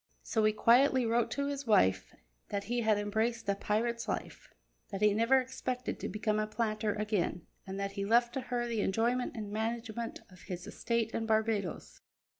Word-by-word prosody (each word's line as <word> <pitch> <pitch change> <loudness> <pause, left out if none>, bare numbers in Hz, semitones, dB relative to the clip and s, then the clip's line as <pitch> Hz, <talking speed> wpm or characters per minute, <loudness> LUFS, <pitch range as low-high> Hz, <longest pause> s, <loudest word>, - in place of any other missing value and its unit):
So 220 -3 0
he 215 - +5
quietly 250 +4 +4
wrote 230 +1 +2
to 280 - -2
his 280 -2 -4
wife 95 - +3 0.4
that 200 -1 -2
he 240 +3 -1
had 220 -2 +3
embraced 220 +2 -1
a 200 - +3
pirate's 230 +4 -1
life, - - -5 0.4
that 195 - -4
he 210 -1 +5
never 230 +5 +4
expected 255 -1 -4
to - - -3
become 215 0 0
a 215 - 0
planter 215 -1 -1
again, 210 -5 -1 0.2
and 190 +1 -5
that 200 0 -2
he 200 0 -3
left 235 +3 +3
to 265 - -2
her 245 -1 -2
the 230 -3 -1
enjoyment 235 +6 0
and 210 -2 -5
management 225 +1 -3
of 185 - -15
his 180 -1 -6
estate 230 -1 -1
in 225 -1 -2
Barbadoes. 220 -5 -1
220 Hz, 185 wpm, -32 LUFS, 210-235 Hz, 0.4 s, he